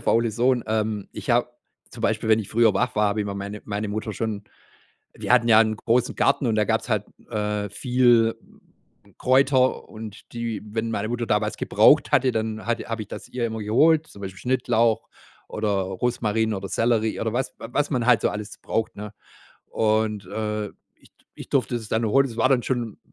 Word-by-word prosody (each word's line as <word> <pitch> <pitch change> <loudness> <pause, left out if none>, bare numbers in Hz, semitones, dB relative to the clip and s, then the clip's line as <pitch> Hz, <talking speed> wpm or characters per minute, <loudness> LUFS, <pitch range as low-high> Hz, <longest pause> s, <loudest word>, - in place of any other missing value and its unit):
der - - -16
faule 115 0 +2
Sohn. 120 +3 +1
Ähm, 110 -2 -1
Ich - - -5
habe 120 +1 +3 0.4
zum - - -10
Beispiel, - - 0
wenn 110 0 +5
ich 105 - -5
früher 115 -1 +3
wach 125 0 0
war, 105 0 +3
habe 105 +1 -1
ich 105 - -2
meine 100 +1 -5
meine 105 0 -3
Mutter 110 +1 -3
schon 105 -1 -3 0.7
wir - - -1
hatten 120 -1 +4
ja 110 -1 +8
'n 110 -1 +2
großen 120 +2 0
Garten, 130 - +2
und 110 - +1
da 105 - +3
gab's - - 0
halt, - - 0 0.3
äh, 105 -1 -2
viel 120 0 +3 0.8
Kräuter 130 0 +2
und 110 -1 -10
die 115 -3 -3
wenn 110 +2 -3
meine 110 0 -2
Mutter 120 0 -2
damals 105 -1 0
gebraucht - - +4
hatte, 130 -1 +4
dann 110 -1 -3
hatte 120 0 -1
habe 115 -1 -3
ich 105 - -8
das - - -8
ihr 125 -2 -2
immer 110 -1 -4
geholt, 155 +9 +3
zum 100 - -14
Beispiel 95 -1 -7
Schnittlauch 115 -3 +1 0.4
oder 110 0 -2
Rosmarin 110 +3 0
oder 95 -1 -5
Sellerie 115 -2 +1
oder 110 -1 -2
was 130 +2 -2
was 140 +6 -2
man 125 -5 0
halt 120 -4 +5
so - - +2
alles 105 0 -6
braucht, 115 - -2
ne? 105 +1 -8 0.5
Und, 110 -2 0
äh, 105 +1 -3 0.3
ich - - -23
d - - -31
ich - - -10
durfte 120 - +1
das 110 -2 -7
dann 110 +2 0
holen. 135 +6 +3
Das 115 -4 -9
war 115 +3 +3
dann 130 -2 +3
schon 120 -4 -2
110 Hz, 200 wpm, -24 LUFS, 105-120 Hz, 0.8 s, ja